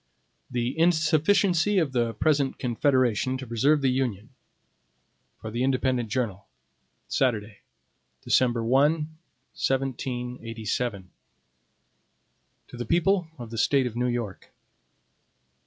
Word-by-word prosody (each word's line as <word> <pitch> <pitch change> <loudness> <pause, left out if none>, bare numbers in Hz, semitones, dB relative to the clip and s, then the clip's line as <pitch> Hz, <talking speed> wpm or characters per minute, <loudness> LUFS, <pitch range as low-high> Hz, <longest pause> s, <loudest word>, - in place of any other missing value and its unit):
15 - - -18
The 125 +6 -3
Insufficiency 175 +4 +3
of 160 -7 +2
the 120 -3 0
Present 145 -3 +1
Confederation 130 0 +1
to 130 - -7
Preserve 140 +6 +2
the 130 - +3
Union 125 -4 -2 1.1
For 110 - -7
the 120 +3 -1
Independent 130 -3 0
Journal. 105 -5 -3 0.6
Saturday, 110 -5 -1 0.6
December 120 -2 +2
1, 135 +6 +4 0.6
1787 125 -4 -2
HAMILTON 90 - -26 1.6
To 125 - -10
the 120 - -4
People 175 - +2
of 120 -3 -9
the 115 - -4
State 135 -2 +3
of 120 -2 -4
New 125 +1 0
York. 120 -6 -4
125 Hz, 110 wpm, -26 LUFS, 115-140 Hz, 1.6 s, 1